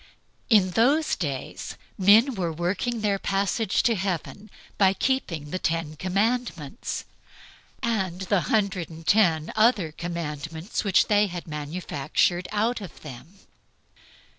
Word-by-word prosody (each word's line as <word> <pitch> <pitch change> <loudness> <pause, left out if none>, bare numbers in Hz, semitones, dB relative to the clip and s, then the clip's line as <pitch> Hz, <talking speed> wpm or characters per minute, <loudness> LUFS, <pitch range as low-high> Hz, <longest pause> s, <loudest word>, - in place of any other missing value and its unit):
In 200 -6 +5
those 280 - +3
days 140 -7 -5 0.2
men 215 +8 +5
were 180 -6 -2
working 185 +8 -2
the 200 -2 +1
passage 195 +1 0
to 235 - +3
Heaven 195 +2 -3 0.3
by 190 -1 +5
keeping 175 - -1
the 185 - -2
Ten 165 -2 -1
Commandments, 195 - -2 0.8
and 195 -6 -1
the 190 0 +1
hundred 195 -6 0
and 165 0 -11
ten 170 -5 +3
other 215 -7 +3
commandments 165 +1 -4
which 200 -2 +4
they 210 0 +3
had 175 -2 -7
manufactured 155 +2 -1
out 220 +3 0
of 190 - -10
them. 155 +7 -11
185 Hz, 120 wpm, -25 LUFS, 165-215 Hz, 0.8 s, In